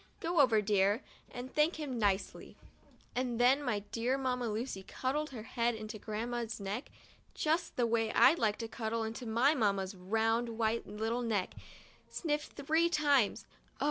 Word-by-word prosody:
Go 335 0 0
over, 230 -6 +5
dear, 205 +3 +2 0.3
and 250 +1 -8
thank 305 +3 +3
him 280 -6 -4
nicely." 200 -2 -1 0.6
And 245 -2 -1
then 255 +4 +5
my 230 -7 -1
dear 245 +3 0
Mamma 250 -3 -1
Lu 220 +3 -2 0.2
cuddled 295 +4 -2
her 235 -5 -7
head 235 +1 0
into 215 0 -7
Grandma's 230 +2 -3
neck 205 +7 -4
in - - -27 0.4
just 320 +3 0
the 245 - +2
way 225 -1 +1
I'd 320 +6 +6
like 210 -2 +1
to 230 - -4
cuddle 225 0 -2
into 230 +2 -5
my 240 +7 +3
Mamma's 200 -7 0
round 225 +5 0
white 225 0 0
little 220 +4 -2
neck 215 -6 -1 0.3
— - - -27
sniffed 300 -2 -2
three 315 +4 +2
times 285 -9 +2 0.3
(Oh! - - -30
235 Hz, 170 wpm, -33 LUFS, 220-265 Hz, 0.6 s, I'd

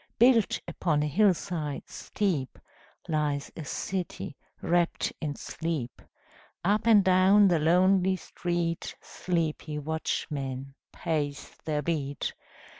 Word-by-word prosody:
Built 235 -3 +5
upon 160 -3 0
a - - 0
hill 190 +5 +4
side 155 -6 -4
steep 165 - -2 0.5
Lies 150 -2 -1
a 160 - -6
city 180 0 -4 0.2
wrapt 175 0 +1
in 150 -3 -2
sleep. 155 -7 -4 0.6
Up 210 +4 +2
and 215 -3 +7
down 190 +2 +6
the 170 -3 +3
lonely 185 +4 +4
street 175 -2 -3
Sleepy 160 -3 -2
watchmen 140 -3 -3 0.2
pace 145 -4 -3
their 150 -1 -1
beat. 145 -4 -2
165 Hz, 110 wpm, -28 LUFS, 150-185 Hz, 0.6 s, and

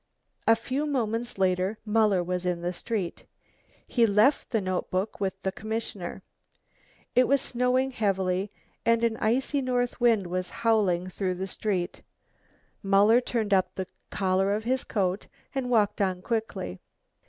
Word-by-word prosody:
A 225 - +7
few 260 +6 -2
moments 240 -4 -1
later 190 +2 +1
Muller 210 -4 +3
was 180 +1 -2
in 180 -1 -1
the 175 +1 -1
street. 195 -2 -4 0.6
He 235 -2 +3
left 215 +8 +3
the 225 - +1
notebook 185 +1 -2
with 190 -1 -2
the 190 - 0
commissioner. 205 -4 -5 0.9
It 250 0 +5
was 280 +1 +4
snowing 255 +1 +1
heavily, 195 -4 0 0.3
and 230 0 +3
an 230 -1 +2
icy 260 +5 +1
north 245 -1 -1
wind 230 -5 +4
was 180 +1 -2 0.2
howling 190 -6 +2
through 185 -1 -2
the 190 +2 -3
streets. 190 -2 -2 0.8
Muller 205 +4 +5
turned 225 -4 -1
up 185 -1 +2
the 190 - -3 0.2
collar 195 +1 +1
of 215 - -3
his 255 +2 0
coat 190 -1 -1 0.3
and 265 -2 -2
walked 210 -4 +2
on 185 -2 0
quickly. 220 - -3
210 Hz, 145 wpm, -27 LUFS, 185-235 Hz, 0.9 s, A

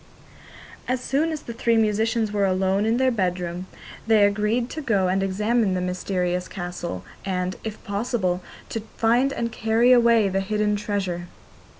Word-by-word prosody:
As 255 0 0
soon 290 +6 0
as 310 -2 -5
the 235 - -6
three 230 0 +2
musicians 220 0 +1
were 200 -1 +1
alone 190 +2 +1
in 225 +1 +2
their 260 0 +3
bedroom 180 -3 -2 0.4
they 220 -2 +5
agreed 210 +4 +1
to 315 - -4
go 205 -9 +1
and 190 +1 +1
examine 210 +1 +1
the - - 0
mysterious 180 0 -1
castle, 175 - -5 0.2
and, 185 -1 -2
if 220 -1 -6
possible, 200 -4 -1 0.3
to 225 - -3 0.2
find 240 +4 +3
and 235 -3 -2
carry 225 +3 +3
away 235 -3 +5
the 195 0 0
hidden 210 +1 0
treasure. 190 -4 -3
210 Hz, 160 wpm, -24 LUFS, 185-230 Hz, 0.4 s, they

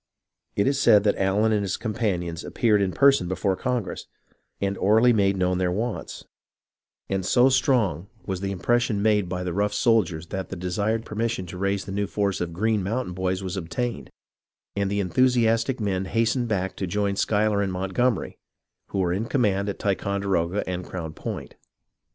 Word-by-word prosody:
It 100 - +2
is 140 0 +1
said 105 -6 +6
that 105 - +2
Allen 100 +3 +2
and 105 -1 +2
his 100 - -2
com 110 -2 -3
panions 90 -7 -2
appeared 105 -4 +2
in 95 -2 +1
person 135 0 +4
before 95 +1 0
Congress, 120 0 -3 0.5
and 100 0 -1
orally 110 +5 +5
made 100 -2 +2
known 90 0 +1
their 90 -1 +1
wants; 110 +5 -4 0.8
and 95 -1 -1
so 125 +8 +4
strong 120 - +1 0.2
was 95 -2 -3
the 100 0 -2
impres 120 +6 +2
sion 105 -5 -1
made 105 -4 +2
by 90 0 -3
the 90 -1 -3
rough 105 +2 0
soldiers 90 -10 +2
that 95 -1 -4
the - - -5
desired 100 +5 -1
permis 115 +2 -1
sion 95 - -5
to 90 +1 -8
raise 100 0 -1
the 100 - -7
new 100 +1 -1
force 100 -2 -1
of 85 -1 -2
Green 105 +4 0
Mountain 105 +1 -2
Boys 95 +1 -2
was 95 0 -4
obtained, 90 - -3 0.7
and 100 -1 0
the 100 +1 -1
enthusiastic 120 +4 +2
men 95 -3 -1
hastened 115 +4 0
back 95 -3 -1
to 95 - -2
join 100 +2 0
Schuyler 105 0 +1
and 100 -1 -1
Montgomery, 95 +3 -1 0.5
who - - -5
were 90 -2 +1
in 100 +5 -1
command 105 -6 +1
at 100 - -4
Ticon 100 0 -1
deroga 95 0 0
and 90 0 -3
Crown 85 -4 -6
Point. - - -6
100 Hz, 185 wpm, -25 LUFS, 95-110 Hz, 0.8 s, said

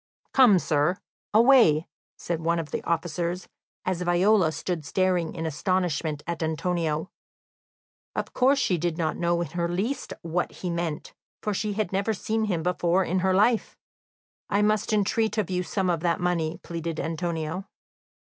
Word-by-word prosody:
"Come, 245 -8 +7
sir, 155 +2 +1 0.3
away," 220 - +6 0.3
said 170 -2 -3
one 170 +1 +1
of 165 -2 -4
the - - -3
officers, 170 +2 -2 0.4
as 185 -1 -1
Viola 180 0 +3
stood 160 +2 -3
staring 180 0 0
in 165 -1 -3
astonishment 160 -2 -1
at 170 -1 -4
Antonio. 160 0 -1 1.0
Of - - -3
course 265 +3 +4
she 185 -10 +1
did 170 0 -1
not 160 -3 0
know 170 0 +1
in 170 - -3
the 170 +1 -1
least 195 +11 -2
what 170 +2 -1
he 180 - -4
meant, 170 -3 -3 0.3
for 210 - 0
she 210 +1 -1
had 205 -3 -2
never 200 +3 0
seen 220 +3 -1
him 175 -6 -1
before 180 +1 +2
in 185 +1 0
her 185 0 +2
life. 220 +3 +2 0.7
"I 205 +1 +2
must 215 0 +1
entreat 215 +2 +1
of 200 -4 0
you 180 0 0
some 185 +2 -1
of 175 -2 +1
that 170 0 0
money," 170 -2 0
pleaded 165 -1 -4
Antonio. 165 +2 -3
175 Hz, 160 wpm, -26 LUFS, 165-195 Hz, 1.0 s, Come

